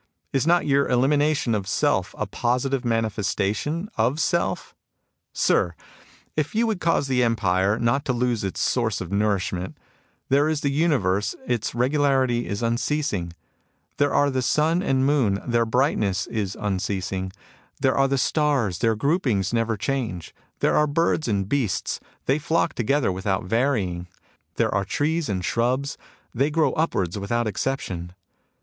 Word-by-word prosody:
Is 135 +2 +1
not 175 0 +4
your 140 -1 +3
elimination 140 0 +2
of 100 -3 -2
self - - 0
a - - -1
positive 125 +2 -1
manifestation 115 - -1
of 125 +7 +2
self? 170 +1 0 0.6
Sir, 85 -1 +1 0.6
if 155 +5 -1
you 230 +2 +3
would 220 -5 -1
cause 165 -4 +2
the 130 -2 +1
empire 100 -4 +2
not 120 +4 +1
to - - +1
lose 120 -3 0
its 95 - -3
source 115 -5 0
of 90 0 -6
nourishment, 100 -3 -1 0.2
— - - -41
there 145 +3 +3
is 155 -2 -1
the 140 - 0
universe, 105 - +1
its 120 -2 -2
regularity 130 -2 +2
is 100 +3 -3
unceasing; 115 - -1 0.6
there 145 0 +2
are 145 0 +3
the 130 -1 0
sun 155 +6 +2
and 135 -8 +1
tnoon, 135 -8 +2
their 120 -1 +2
brightness 110 -6 +1
is 105 -4 -3
unceasing; 95 -2 -2 0.5
there 135 -1 +2
are 135 0 +3
the 140 0 0
stars, 135 - +1
their 115 -1 +2
groupings 120 - 0
never 115 -1 0
change; 110 - -3 0.3
there - - +3
are 150 - +4
birds 155 0 +1
and 100 -3 0
beasts, 120 -6 -1 0.3
they 135 +3 +2
flock 160 +2 0
together 130 0 +1
without 95 +1 -1
varying; 95 -5 0 0.5
there - - +1
are 100 0 +1
trees 150 - -1
and 95 -3 -2
shrubs, 130 +5 0 0.4
they 135 +5 +1
grow 155 -3 +2
upwards 100 - -1
without 120 +4 -1
exception. 90 -6 -3
120 Hz, 150 wpm, -24 LUFS, 100-145 Hz, 0.6 s, not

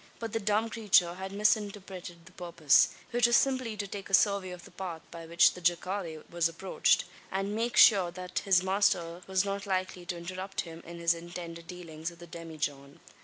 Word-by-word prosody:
But 225 -2 -6
the 225 - 0
dumb 210 +2 +1
creature 210 -6 +3
had 190 +1 -7
misinterpreted 200 -4 -1
the 185 - -15
purpose 170 -5 +3 0.2
which 240 0 +4
was 235 - +3
simply 255 -5 0
to 205 - -3
take 200 0 -7
a 195 - +6
survey 200 -2 +2
of 180 -1 -9
the - - -14
path 175 -3 -6
by 165 -1 -9
which 170 +1 +5
the 180 - -10
jacale 175 -1 -1
was 170 -1 0
approached, 175 +3 +1 0.3
and 195 +2 -2
make 235 +2 -1
sure, 195 -5 +7
that, 180 +1 -4
his 185 -2 +3
master 190 -3 +1
was 190 0 +1
not 200 0 -4
likely 185 -1 -2
to 180 - -3
interrupt 185 +3 -5
him 165 -1 -10
in 170 0 -8
his 170 0 +2
intended 170 0 -8
dealings 165 -2 -7
with 170 - -15
the 175 - -11
demijohn. 150 -5 -6
180 Hz, 195 wpm, -30 LUFS, 170-200 Hz, 0.3 s, sure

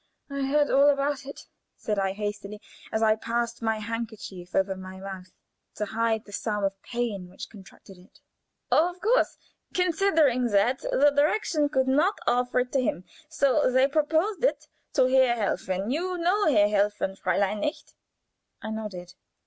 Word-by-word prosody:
"Oh, - - -5
yes! 280 +2 +2
I - - +6
know 275 - +4
all 285 - +7
about 280 -1 0
it," 280 - -8 0.4
said 210 -2 -2
I, 195 -1 0
hastily, 205 0 -5 0.3
as 220 0 0
I 215 0 +4
passed 235 +1 -3
my 225 -1 0
handkerchief 215 -5 -6
over 190 0 +1
my 190 0 -9
mouth 190 -2 -8 0.4
to 210 - -2
hide 225 +1 -1
the 205 - -14
spasm 210 0 -2
of 195 0 -2
pain 225 -7 -4
which 185 - -10
contracted 195 -2 -15
it. 180 - -21 0.5
"Of 355 +3 +2
course, 460 +6 +2 0.4
considering 325 -8 +2
all - - 0
that, 230 +6 +3
the 285 +1 +2
Direktion 300 0 +2
could 265 -2 +1
not 310 +10 +2
offer 250 +1 +2
it 250 0 -5
to 270 - +2
him, 185 -7 -2 0.3
so 280 -2 +2
they 260 +1 +4
proposed 320 - 0
it - - +1 0.3
to 260 - +4
Herr 255 -1 +4
Helfen 195 -1 -2
you 360 +5 -2
know 365 +5 +2
Herr 205 -5 +5
Helfen, 205 -1 0
Fräulein, 195 +3 0
nicht?" 300 +9 -4 0.7
I 220 - -6
nodded. 190 -5 -6
235 Hz, 170 wpm, -26 LUFS, 205-285 Hz, 0.7 s, all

